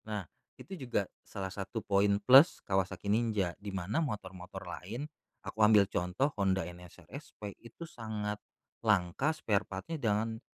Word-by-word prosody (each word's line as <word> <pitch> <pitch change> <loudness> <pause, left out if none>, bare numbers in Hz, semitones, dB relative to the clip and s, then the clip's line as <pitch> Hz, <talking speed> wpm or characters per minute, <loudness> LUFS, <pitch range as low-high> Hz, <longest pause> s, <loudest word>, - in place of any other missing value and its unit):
Nah, 105 -3 -3 0.3
itu 195 - -10
juga 110 -5 0 0.2
salah 95 -1 -6
satu 100 +3 -4
poin 100 0 +3
plus 135 - +7
Kawasaki 95 0 -1
Ninja, 105 -5 +1
di 100 - -5
mana 95 - -1
motor-motor 95 - -5
lain, 115 +10 -5 0.4
aku 110 - -7
ambil 105 -1 +7
contoh 90 +13 0
Honda 95 -1 +2
NSR 90 0 -11
SP 105 -2 -8
itu 115 +9 -10
sangat 110 -7 -4 0.4
langka 105 - +2
sparepart-nya 110 +2 -2
dan 110 +1 0
105 Hz, 135 wpm, -32 LUFS, 95-115 Hz, 0.4 s, plus